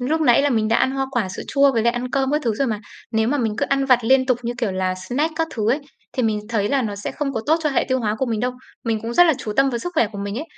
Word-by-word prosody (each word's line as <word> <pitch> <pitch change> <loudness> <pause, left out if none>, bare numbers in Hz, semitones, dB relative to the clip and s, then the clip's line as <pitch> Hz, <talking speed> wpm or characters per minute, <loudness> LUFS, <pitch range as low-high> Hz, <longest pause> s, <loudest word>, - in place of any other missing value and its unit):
lúc 300 +6 0
nãy 260 -3 +5
là 290 - +2
mình 220 -3 +1
đã 230 - +3
ăn - - +2
hoa 270 0 -1
quả, 235 -7 -1
sữa 185 - -6
chua 280 -1 +4
với 230 - +1
lại 235 +1 +3
ăn 245 +1 -4
cơm 270 -1 0
các 300 +1 +1
thứ 230 -3 +1
rồi 275 +6 0
mà. 215 -4 -2 0.3
Nếu 220 -1 +1
mà 290 +3 +1
mình 225 -4 0
cứ - - 0
ăn 275 0 +1
vặt 255 -2 +5
liên 260 +2 +4
tục 255 -3 +2
như 235 0 -2
kiểu 230 -7 -1
là 185 0 -1
snack 250 - -2
các 325 0 0
thứ 220 -1 +1
ấy, 275 +5 +1 0.3
thì 255 - -1
mình 215 -2 +1
thấy 210 -3 0
là 275 +1 +1
nó 210 -3 -3
sẽ 205 - -5
không 290 -2 -3
có 225 - -2
tốt 315 - +4
cho 300 - +1
hệ 270 - +1
tiêu 260 0 +2
hóa 210 -2 0
của 265 - 0
mình 225 -3 -1
đâu. 250 +1 0 0.3
Mình 225 -1 0
cũng 230 +1 -4
rất 350 - +7
là 325 - +5
chú 215 - -4
tâm 275 0 +4
vào 240 - -2
sức 355 +10 -5
khỏe 235 - +3
của 200 - -7
mình 200 +2 -4
ấy. 300 - -4
245 Hz, 345 wpm, -21 LUFS, 220-275 Hz, 0.3 s, rất